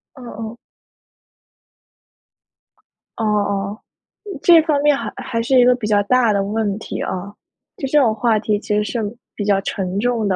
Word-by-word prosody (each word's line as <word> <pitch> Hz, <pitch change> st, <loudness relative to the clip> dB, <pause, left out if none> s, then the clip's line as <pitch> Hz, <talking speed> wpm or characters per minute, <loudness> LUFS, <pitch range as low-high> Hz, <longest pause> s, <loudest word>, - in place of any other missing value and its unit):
哦 265 Hz, -, -13 dB
哦。 225 Hz, -1 st, -7 dB, 2.6 s
哦 225 Hz, -, -2 dB
哦， 205 Hz, -1 st, -1 dB, 0.6 s
这 340 Hz, -2 st, +7 dB
方 300 Hz, -3 st, +1 dB
面 295 Hz, 0 st, +4 dB
还 -, -, -5 dB
还 230 Hz, -2 st, -3 dB
是 260 Hz, +3 st, +2 dB
一 -, -, +7 dB
个 250 Hz, -, +6 dB
比 235 Hz, -4 st, -4 dB
较 205 Hz, -1 st, +3 dB
大 240 Hz, 0 st, +3 dB
的 200 Hz, -1 st, +1 dB
问 205 Hz, 0 st, -1 dB
题 -, -, -6 dB
啊。 195 Hz, +2 st, -4 dB, 0.4 s
就 270 Hz, -, -3 dB
这 300 Hz, -, +2 dB
种 235 Hz, -6 st, +3 dB
话 225 Hz, 0 st, +1 dB
题， 210 Hz, -1 st, 0 dB
其 210 Hz, -, -2 dB
实 210 Hz, -, +2 dB
是 230 Hz, +2 st, -3 dB, 0.3 s
比 205 Hz, -, -3 dB
较 200 Hz, -1 st, +3 dB
沉 190 Hz, -1 st, -3 dB
重 235 Hz, -1 st, 0 dB
的。 190 Hz, -, +1 dB
220 Hz, 185 characters per minute, -19 LUFS, 205-245 Hz, 2.6 s, 这